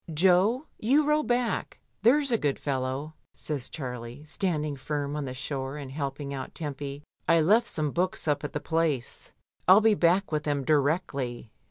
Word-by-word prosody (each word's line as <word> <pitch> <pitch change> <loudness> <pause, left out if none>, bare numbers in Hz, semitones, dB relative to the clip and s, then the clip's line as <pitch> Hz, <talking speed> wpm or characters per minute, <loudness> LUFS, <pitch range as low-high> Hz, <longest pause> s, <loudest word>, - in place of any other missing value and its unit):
"Jo, 190 - +3
you 280 +7 +3
row 300 0 +3
back, 245 -4 -1 0.2
there's 275 +5 +4
a 230 - +4
good 145 -2 0
fellow," 135 +2 -3 0.2
says 145 -5 -5
Charlie, 125 -1 -6
standing 155 -3 -1
firm 145 +1 -3
on 150 -2 -2
the 130 -1 -5
shore 135 +1 -4
and 140 -3 -7
helping 140 0 -4
out 130 -1 -6
Tempy. 145 -2 -5 0.2
"I 165 0 +5
left 215 +9 +4
some 150 -2 0
books 180 0 -1
up 150 -1 +1
at 145 - -5
the 150 - -1
Place; 160 -6 -1 0.4
FU 190 +3 +9
be 220 0 +4
back 185 0 +2
with 155 -1 0
them 145 -2 -1
directly." 140 -5 0
150 Hz, 170 wpm, -28 LUFS, 140-185 Hz, 0.4 s, FU